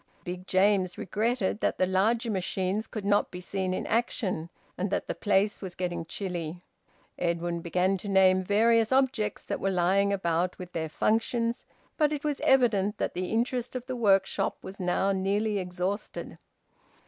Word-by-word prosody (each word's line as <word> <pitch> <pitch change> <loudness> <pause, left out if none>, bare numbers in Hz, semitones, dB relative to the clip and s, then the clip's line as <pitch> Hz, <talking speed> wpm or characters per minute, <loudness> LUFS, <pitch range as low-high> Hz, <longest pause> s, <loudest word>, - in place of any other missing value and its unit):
Big 180 +1 -6
James 190 -1 +2
regretted 215 +1 -1
that - - 0
the 185 - +3
larger 220 +6 +1
machines 190 +2 -1
could 215 -3 -6
not 205 0 +3
be 180 - -7
seen 185 +1 -2
in 185 - -2
action, 205 -7 -1 0.3
and 190 +2 -2
that - - -1
the - - -1
place 205 0 +1
was 185 -3 -6
getting 175 -2 -3
chilly. 175 -6 -4 0.6
Edwin 170 0 -1
began 180 +3 +1
to 195 - -8
name 190 -1 +5
various 225 +3 +3
objects 255 -6 +1
that - - -3
were 195 - 0
lying 190 +2 +2
about, 175 -2 0
with 180 -1 -9
their 160 -1 -2
functions, 230 +6 0 0.3
but 300 -2 +3
it 295 -2 -3
was 295 -2 -2
evident 215 -6 +3
that - - -2
the 180 +1 -2
interest 245 +2 -1
of 250 -1 -4
the 255 -1 -4
workshop 195 -5 +2
was 190 +1 -8
now 185 +2 +1
nearly 200 +2 0
exhausted. 185 +3 -4
195 Hz, 165 wpm, -28 LUFS, 180-220 Hz, 0.6 s, name